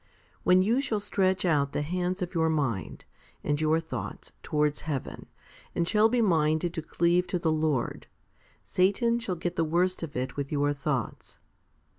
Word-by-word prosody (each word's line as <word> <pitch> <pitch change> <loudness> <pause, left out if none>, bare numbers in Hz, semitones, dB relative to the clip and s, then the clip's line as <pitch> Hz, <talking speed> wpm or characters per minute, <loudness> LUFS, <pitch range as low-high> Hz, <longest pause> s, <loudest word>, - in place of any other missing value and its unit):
When 185 +1 +5
you 235 +7 +2
shall 230 -6 -1
stretch 190 -2 +1
out 145 -4 +2
the 150 - -1
hands 180 +3 -1
of 180 - -6
your 160 -2 +2
mind, 135 -11 -2 0.4
and 145 +1 0
your 155 +1 +3
thoughts, 130 - -6
towards 150 -1 0
heaven, 145 -5 -5 0.5
and 170 - 0
shall 215 +2 +4
be 240 0 +2
minded 160 -2 +2
to 165 - -3
cleave 175 +3 +1
to 180 - -1
the 165 -2 0
Lord, 155 -5 -1 0.6
Satan 230 +6 +2
shall 200 -6 -3
get 175 +1 -4
the 165 - +3
worst 175 +4 +1
of 165 -4 -6
it 130 +1 -3
with 140 -1 -4
your 145 -1 +1
thoughts. 135 -5 -3
165 Hz, 170 wpm, -28 LUFS, 150-185 Hz, 0.6 s, When